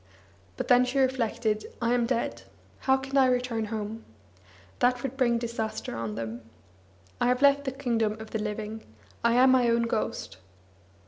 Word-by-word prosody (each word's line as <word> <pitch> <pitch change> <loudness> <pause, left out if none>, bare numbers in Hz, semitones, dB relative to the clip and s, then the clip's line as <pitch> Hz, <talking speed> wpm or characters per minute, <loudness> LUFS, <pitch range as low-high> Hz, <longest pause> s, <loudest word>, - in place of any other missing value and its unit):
But - - -3
then 250 0 +6
she 250 +2 -2
reflected: 235 -4 0
"I 235 0 +1
am 240 -1 +2
dead. 240 -1 -1 0.4
How 265 0 +3
can 270 +1 -3
I 265 -1 +6
return 245 -3 0
home? 215 +1 -5 0.8
That 245 0 +2
would 270 -1 -3
bring 245 -3 +2
disaster 230 -2 -4
on 115 -2 -4
them. 115 +1 -5 0.8
I - - +3
have 250 +2 +1
left 280 0 +5
the 265 - -1
kingdom 235 -5 0
of 220 0 -9
the 220 - -2
living; 210 +1 -4 0.4
I 235 0 +4
am 260 +1 +6
my 250 -2 +4
own 235 0 +3
ghost!" 225 - -3
235 Hz, 170 wpm, -27 LUFS, 220-255 Hz, 0.8 s, then